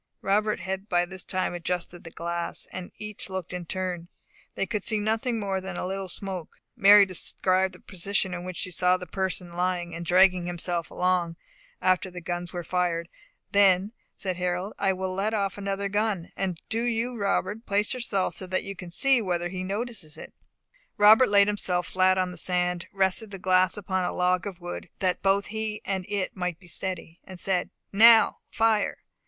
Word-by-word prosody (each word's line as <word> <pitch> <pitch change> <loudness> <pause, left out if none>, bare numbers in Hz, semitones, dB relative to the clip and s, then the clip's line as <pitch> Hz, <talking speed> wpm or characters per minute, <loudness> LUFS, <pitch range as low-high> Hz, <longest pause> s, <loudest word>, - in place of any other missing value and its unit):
Robert 210 0 +1
had 190 +2 -4
by 175 0 +3
this 190 +1 -6
time 185 -1 -2
adjusted 175 0 -3
the 165 - -8
glass, 170 +1 -4
and 185 -1 -7
each 210 -1 -5
looked 190 -2 -5
in 180 -2 -5
turn. 180 -2 -3 0.5
They - - 0
could 210 -2 -3
see 220 - 0
nothing 225 +3 0
more 195 -2 -1
than 190 -1 -6
a - - -2
little 190 0 -3
smoke. 185 -2 -5 0.2
Mary 200 +1 +8
described 185 0 +1
the - - -15
position 190 0 -2
in 175 0 -5
which 185 -1 -6
she 185 - -1
saw 180 +1 +3
the 180 - -8
person 185 -2 -3
lying, 175 -1 -1
and 170 +1 -5
dragging 180 0 +4
himself 175 -1 -3
along, 180 -2 0 0.5
after 185 0 +2
the 180 0 -8
guns 175 0 -4
were 175 -1 -4
fired. 170 -1 -1 0.4
"Then," 200 0 +4 0.2
said 185 -2 -3
Harold, 180 +2 -2
"I 195 -1 +3
will 185 0 -3
let 205 +4 0
off 200 -1 -1
another 200 0 -2
gun; 205 -3 -1
and 185 -4 -2
do 225 +1 -1
you, 240 +1 -1
Robert, 205 +1 -1
place 205 +3 +1
yourself 220 -7 -1
so 185 - -5
that 185 +1 -1
you 195 0 -6
can 180 -1 -9
see 265 +7 +3
whether 175 -3 -1
he 185 0 -4
notices 200 -4 -3
it." - - -10 0.6
Robert 215 +5 +7
laid 200 -1 +6
himself 185 -4 0
flat 185 0 +3
on 185 -1 0
the 180 - -9
sand, 180 0 -1
rested 195 +2 0
the 195 - -7
glass 185 +1 +3
upon 190 -2 -1
a - - -1
log 180 +2 +1
of 185 -3 -7
wood, 175 0 -7
that 185 -2 0
both 195 +1 +2
he 220 -1 -3
and 190 -2 -2
it 200 -2 -2
might 180 -3 -2
be 190 - -19
steady, 175 -1 -4
and 185 -1 -10
said, 180 -2 0 0.2
"Now 225 +2 +7
fire!" 225 -2 +2
185 Hz, 190 wpm, -27 LUFS, 180-200 Hz, 0.6 s, Mary